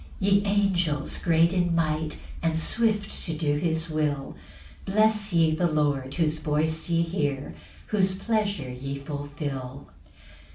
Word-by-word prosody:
2 190 Hz, -, -1 dB
Ye 200 Hz, 0 st, +4 dB
angels 180 Hz, -7 st, +1 dB
great 165 Hz, +1 st, +3 dB
in 175 Hz, -2 st, +1 dB
might, 155 Hz, -1 st, 0 dB, 0.2 s
And 165 Hz, -1 st, +1 dB
swift 210 Hz, +3 st, 0 dB
to 165 Hz, -, -2 dB
do 150 Hz, -2 st, 0 dB
his 160 Hz, 0 st, 0 dB
will, 150 Hz, -3 st, -2 dB, 0.5 s
Bless 215 Hz, +1 st, +2 dB
ye 165 Hz, -2 st, +4 dB
the 175 Hz, +2 st, +2 dB
Lord, 145 Hz, -3 st, 0 dB
whose 155 Hz, -2 st, +1 dB
voice 160 Hz, +2 st, -1 dB
ye 170 Hz, 0 st, +3 dB
hear, 145 Hz, -5 st, -2 dB, 0.4 s
Whose 190 Hz, -3 st, +2 dB
pleasure 200 Hz, -, -1 dB
ye 135 Hz, +2 st, -5 dB
fulfil. 140 Hz, -2 st, -6 dB
160 Hz, 135 wpm, -26 LUFS, 145-190 Hz, 0.5 s, Ye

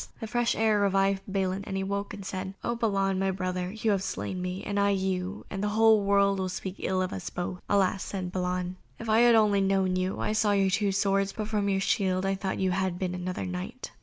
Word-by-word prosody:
The -, -, -4 dB
fresh 240 Hz, +1 st, +1 dB
air 220 Hz, -1 st, +3 dB
revived 195 Hz, -1 st, +2 dB
Balin, 190 Hz, 0 st, -1 dB
and 195 Hz, -, -3 dB
he 195 Hz, -, -1 dB
awoke 200 Hz, +1 st, -3 dB
and 200 Hz, -2 st, -8 dB
said: 190 Hz, 0 st, -5 dB
"O 235 Hz, -, 0 dB
Balan, 195 Hz, -4 st, +1 dB
my 195 Hz, 0 st, +1 dB
brother, 185 Hz, -1 st, -2 dB
you 220 Hz, +1 st, 0 dB
have 195 Hz, -2 st, +1 dB
slain 185 Hz, -1 st, -4 dB
me, 180 Hz, +1 st, -4 dB
and 205 Hz, 0 st, -1 dB
I 200 Hz, 0 st, +3 dB
you, 190 Hz, 0 st, -1 dB
and 195 Hz, 0 st, -3 dB
the -, -, +1 dB
whole 220 Hz, -1 st, +6 dB
world 200 Hz, 0 st, +3 dB
will 185 Hz, 0 st, -1 dB
speak 185 Hz, +1 st, -5 dB
ill 185 Hz, 0 st, 0 dB
of 185 Hz, -, -3 dB
us 95 Hz, -, -5 dB
both." 180 Hz, 0 st, -4 dB
"Alas," 195 Hz, -1 st, +2 dB
sighed 185 Hz, -3 st, -4 dB
Balan, 180 Hz, 0 st, -2 dB, 0.2 s
"if 230 Hz, -, -7 dB
I 220 Hz, +1 st, +4 dB
had 240 Hz, -1 st, +6 dB
only 210 Hz, -3 st, +4 dB
known 190 Hz, -1 st, +2 dB
you! 185 Hz, +1 st, -1 dB
I -, -, -1 dB
saw 215 Hz, -1 st, +2 dB
your 195 Hz, -1 st, +2 dB
two 200 Hz, +1 st, +1 dB
swords, 195 Hz, 0 st, +1 dB
but 215 Hz, -1 st, -4 dB
from 205 Hz, -2 st, 0 dB
your 195 Hz, -1 st, +1 dB
shield 190 Hz, -2 st, +1 dB
I 195 Hz, -, +1 dB
thought 190 Hz, 0 st, -3 dB
you 190 Hz, -1 st, +1 dB
had 190 Hz, -1 st, -1 dB
been 180 Hz, -1 st, -2 dB
another 180 Hz, +1 st, -4 dB
knight." 185 Hz, +8 st, -6 dB
195 Hz, 240 wpm, -28 LUFS, 185-205 Hz, 0.2 s, whole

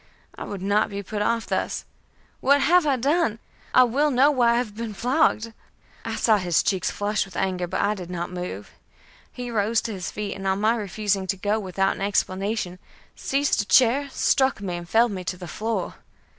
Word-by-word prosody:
I -, -, -7 dB
would 195 Hz, -2 st, -6 dB
not 205 Hz, +2 st, +2 dB
be 200 Hz, 0 st, -5 dB
put 205 Hz, +2 st, -4 dB
off 230 Hz, +2 st, 0 dB
thus. -, -, -2 dB, 0.5 s
"What 280 Hz, +1 st, +4 dB
have 350 Hz, +1 st, +4 dB
I 280 Hz, -, +3 dB
done? 275 Hz, -2 st, +1 dB, 0.3 s
I 255 Hz, -, +7 dB
will 275 Hz, +5 st, +2 dB
know 275 Hz, +2 st, +4 dB
why 240 Hz, -4 st, +3 dB
I -, -, +2 dB
have 230 Hz, -4 st, -2 dB
been 225 Hz, -2 st, -5 dB
flogged." 235 Hz, -2 st, +1 dB, 0.5 s
I -, -, -3 dB
saw 220 Hz, -2 st, +3 dB
his 175 Hz, -3 st, +1 dB
cheeks 190 Hz, -3 st, 0 dB
flush 205 Hz, 0 st, -1 dB
with 195 Hz, -, -10 dB
anger, 185 Hz, -2 st, -1 dB
but -, -, -2 dB
I 205 Hz, +1 st, +2 dB
did 180 Hz, -4 st, -8 dB
not 175 Hz, 0 st, -4 dB
move. 180 Hz, -, -6 dB, 0.6 s
He 245 Hz, -1 st, -6 dB
rose 220 Hz, +1 st, +1 dB
to 225 Hz, -, -4 dB
his 185 Hz, -2 st, -5 dB
feet, 205 Hz, -1 st, -4 dB
and 195 Hz, 0 st, -5 dB
on 190 Hz, +1 st, +1 dB
my 220 Hz, +3 st, +3 dB
refusing 205 Hz, -2 st, -2 dB
to 195 Hz, -, -1 dB
go 205 Hz, +3 st, 0 dB
without 195 Hz, -1 st, 0 dB
an -, -, -9 dB
explanation, 195 Hz, -1 st, -1 dB, 0.4 s
seized 275 Hz, -4 st, 0 dB
a -, -, -6 dB
chair, 260 Hz, +6 st, +4 dB
struck 265 Hz, -2 st, +2 dB
me, 190 Hz, -3 st, -4 dB
and 175 Hz, 0 st, -8 dB
felled 230 Hz, +2 st, +4 dB
me 185 Hz, -2 st, -5 dB
to 180 Hz, -, -3 dB
the 175 Hz, -1 st, -8 dB
floor. 220 Hz, +7 st, -3 dB
210 Hz, 205 wpm, -24 LUFS, 190-240 Hz, 0.6 s, I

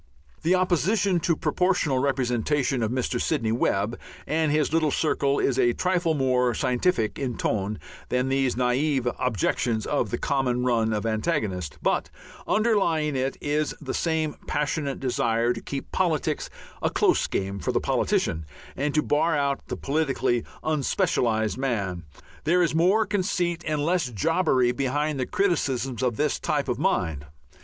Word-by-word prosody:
The 175 Hz, +3 st, +3 dB
opposition 185 Hz, +1 st, +2 dB
to 170 Hz, 0 st, +1 dB
Proportional 180 Hz, -7 st, +1 dB
Representation 130 Hz, 0 st, 0 dB
of 110 Hz, -, 0 dB
Mr. 125 Hz, 0 st, -1 dB
Sidney 120 Hz, -9 st, 0 dB
Webb 110 Hz, -1 st, 0 dB, 0.3 s
and 155 Hz, 0 st, +1 dB
his 150 Hz, 0 st, +1 dB
little 160 Hz, -2 st, +3 dB
circle 140 Hz, -2 st, +1 dB
is 135 Hz, -1 st, +1 dB
a 120 Hz, -1 st, +4 dB
trifle 180 Hz, -1 st, +1 dB
more 125 Hz, -3 st, +2 dB
"scientific" 125 Hz, -1 st, 0 dB
in 130 Hz, -4 st, -3 dB
tone 105 Hz, 0 st, -1 dB, 0.3 s
than 125 Hz, +1 st, +1 dB
these 135 Hz, -2 st, +1 dB
naive 130 Hz, +1 st, +1 dB
objections 115 Hz, -1 st, 0 dB
of 135 Hz, -7 st, 0 dB
the -, -, -2 dB
common 125 Hz, -3 st, 0 dB
run 115 Hz, -3 st, +2 dB
of 105 Hz, 0 st, -1 dB
antagonist, 110 Hz, -, -1 dB
but -, -, +1 dB, 0.4 s
underlying 175 Hz, -10 st, +2 dB
it 130 Hz, +1 st, -1 dB
is 150 Hz, 0 st, -1 dB
the 135 Hz, -4 st, -5 dB
same 160 Hz, -3 st, -1 dB
passionate 145 Hz, -1 st, -1 dB
desire 120 Hz, -2 st, +1 dB
to 115 Hz, -, -7 dB
keep 140 Hz, -1 st, -6 dB
politics 160 Hz, -4 st, 0 dB, 0.3 s
a -, -, +1 dB
close -, -, +2 dB
game 100 Hz, 0 st, -2 dB
for -, -, -1 dB
the -, -, +1 dB
politician 80 Hz, -1 st, 0 dB, 0.3 s
and 145 Hz, +2 st, -1 dB
to 150 Hz, -, +3 dB
bar 155 Hz, +2 st, +2 dB
out 140 Hz, -1 st, -1 dB
the -, -, -4 dB
politically 135 Hz, -5 st, 0 dB, 0.2 s
unspecialized 120 Hz, -7 st, 0 dB
man. 100 Hz, -10 st, -2 dB, 0.4 s
There 175 Hz, +4 st, +3 dB
is 165 Hz, -, +1 dB
more 185 Hz, +7 st, +3 dB
conceit 180 Hz, -4 st, -1 dB
and 150 Hz, -2 st, 0 dB
less 170 Hz, -5 st, +1 dB
jobbery 130 Hz, -, +2 dB
behind 140 Hz, +3 st, -1 dB
the 130 Hz, -, -1 dB
criticisms 135 Hz, -, 0 dB
of 125 Hz, -4 st, 0 dB
this 150 Hz, -1 st, 0 dB
type 145 Hz, -2 st, -1 dB
of 125 Hz, -1 st, -1 dB
mind. 80 Hz, -, 0 dB
140 Hz, 150 wpm, -25 LUFS, 120-160 Hz, 0.4 s, a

